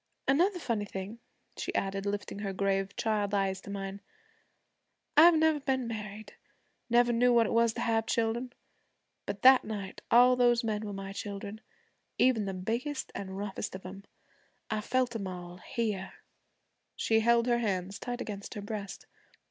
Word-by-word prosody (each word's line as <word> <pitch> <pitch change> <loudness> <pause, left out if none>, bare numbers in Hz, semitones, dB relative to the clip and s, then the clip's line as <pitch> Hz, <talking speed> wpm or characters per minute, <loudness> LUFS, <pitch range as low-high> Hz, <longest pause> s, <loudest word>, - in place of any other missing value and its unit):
An' 270 - +4
another 380 +1 +2
funny 230 -10 -2
thing,' 195 +3 -6 0.4
she - - -4
added 195 +1 -1
lifting 205 0 -3
her 200 -2 -3
grave 195 0 0
child's 210 -2 0
eyes 190 -1 0
to - - -11
mine: 195 0 -5 1.1
'I've 325 +2 +8
never 315 -1 +3
been 265 -2 -1
married 215 -1 -6 0.6
never 240 0 +4
known 245 +1 +4
what 230 -1 +5
it - - -2
was 230 0 +3
to 235 - -4
have 225 -1 +1
children 235 +2 0 0.8
but 200 - -5
that 260 0 +8
night 205 -3 -6
all 250 +1 +7
those 240 -1 +3
men 215 -1 -2
were - - -4
my 195 0 -6
children, 200 +1 -6 0.6
even 240 -5 +3
the 195 - -3
biggest 235 +9 -3
an' 195 - -5
roughest 195 0 -5
of 190 - -9
'em. 195 +2 -8 0.7
I 215 -1 0
felt 250 +1 0
'em 200 -4 -3
all 180 -1 -7
here' 205 -1 -3 0.8
She 225 0 +2
held 235 +1 +4
her 240 -1 +2
hands 195 -3 -2
tight 245 0 -4
against 200 -2 -6
her 205 - -4
breast. 205 -2 -6
215 Hz, 165 wpm, -30 LUFS, 195-240 Hz, 1.1 s, I've